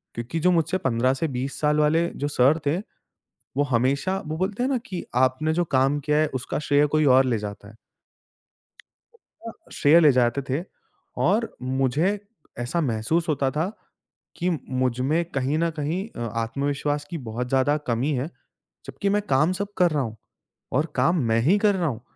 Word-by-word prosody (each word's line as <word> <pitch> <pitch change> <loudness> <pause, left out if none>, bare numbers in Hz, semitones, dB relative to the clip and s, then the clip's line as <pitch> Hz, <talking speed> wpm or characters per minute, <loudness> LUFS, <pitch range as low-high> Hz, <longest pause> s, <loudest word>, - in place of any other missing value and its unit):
क्योंकि 120 +8 -3
जो 180 +3 +3
मुझसे 170 +2 +1
15 130 +1 +2
से 160 +4 -1
20 135 +2 -4
साल 150 0 +2
वाले 160 +3 +3 0.2
जो - - +1
सर 145 +3 +3
थे, 155 +5 +2 0.8
वो 145 - +3
हमेशा 140 +9 +1
वो 155 - -3
बोलते 195 +5 -1
हैं 265 - +1
ना 260 - +1
कि 185 -7 -5
आपने 130 +5 +2
जो 175 0 +1
काम 135 +3 +3
किया 150 +1 +1
है, 155 - +3
उसका 125 - -3
श्रेय 145 0 +3
कोई 155 +1 +1
और 135 - +5
ले 120 -3 +1
जाता 100 -1 -7
है। 110 - -14 1.7
अ, - - -4 0.2
श्रेय 160 +3 +5
ले 150 -4 +6
जाते 125 +2 +2
थे 145 +7 -1 0.6
और 220 +5 +1
मुझे 135 +10 +1 0.4
ऐसा 120 +8 -1
महसूस 145 +6 0
होता 140 -3 +1
था 160 +7 -1 0.7
कि 180 +2 0 0.2
मुझमें 130 +6 0
कहीं 135 +3 0
न 170 0 +1
कहीं 170 +8 -2
अ, - - -10 0.2
आत्मविश्वास 145 +5 -2
की 170 - -4
बहुत 125 +2 -3
ज़्यादा 135 +3 +2
कमी 125 +6 0
है, 135 +6 -2 0.6
जबकि 200 - -3
मैं 205 +1 +2
काम 150 +6 +3
सब 200 +2 -4
कर 175 -2 +4
रहा 145 -2 +1
हूँ 110 -2 -6 0.6
और 145 +5 +2
काम 170 +1 +2
मैं 115 - +3
ही 180 - +4
कर 205 -1 +3
रहा 175 -4 0
हूँ, 120 -4 -4
145 Hz, 180 wpm, -24 LUFS, 130-170 Hz, 1.7 s, ले